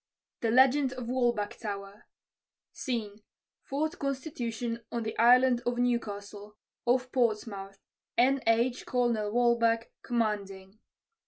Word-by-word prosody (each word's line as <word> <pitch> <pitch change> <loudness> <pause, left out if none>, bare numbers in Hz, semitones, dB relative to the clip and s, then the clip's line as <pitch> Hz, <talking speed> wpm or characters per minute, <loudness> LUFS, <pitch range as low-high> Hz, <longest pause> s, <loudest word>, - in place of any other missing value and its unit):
THE 230 - 0
LEGEND 260 +2 +4
OF 250 -2 -6
WALBACH 240 -5 0
TOWER 200 -2 -6 0.7
SCENE. 220 -5 -4 0.5
_Fort 310 +5 -2
Constitution 245 -4 -3
on 235 -1 -2
the 220 0 -4
Island 245 +1 +5
of 240 0 -1
Newcastle, 210 -4 -3 0.3
off 255 +1 +2
Portsmouth, 210 -5 -1 0.4
N. 265 +3 +4
H., 235 +2 +2
Colonel 235 -4 0
Walbach, 230 -1 +2
commanding. 205 -4 -3
235 Hz, 105 wpm, -29 LUFS, 210-250 Hz, 0.7 s, Island